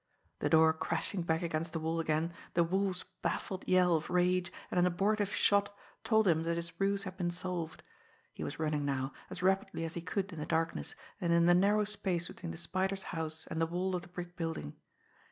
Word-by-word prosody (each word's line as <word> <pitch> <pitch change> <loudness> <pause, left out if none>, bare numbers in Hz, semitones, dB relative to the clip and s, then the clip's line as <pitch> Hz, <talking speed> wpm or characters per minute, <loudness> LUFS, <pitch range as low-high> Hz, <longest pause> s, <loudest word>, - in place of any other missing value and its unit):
The - - +1
door 160 0 +6
crashing 180 +4 -2
back 165 0 0
against 165 0 -2
the 165 - -1
wall 160 +1 -1
again, 160 +1 0 0.2
the 170 - +5
Wolf's 190 +1 0 0.2
baffled 190 -1 -2
yell 180 -2 +5
of 155 - -2
rage, 180 0 +2 0.2
and 180 - +2
an 180 - +5
abortive 200 +3 +1
shot, 200 0 +2 0.3
told 220 -2 +4
him 160 -2 +4
that 170 +1 0
his 170 0 -4
ruse 200 0 +1
had 185 -2 -7
been 175 -2 0
solved. 175 -2 -4 0.5
He - - -6
was - - -4
running 150 -2 0
now, 135 -1 -1 0.2
as 180 - -6
rapidly 190 -3 +1
as 165 - -4
he 170 - -4
could 195 +2 -2
in 165 - -6
the 150 - -4
darkness 160 - -1 0.3
and 170 - +1
in 170 0 +5
the 175 - +7
narrow 205 +4 +4
space 190 -5 -2
between - - -7
the 80 - -7
Spider's 190 - -1
house 160 -1 -5
and 160 - -3
the 165 - +3
wall 180 +3 -1
of 180 - -2
the 175 - -12
brick 175 0 -7
building. 165 - -3
175 Hz, 210 wpm, -33 LUFS, 160-185 Hz, 0.5 s, the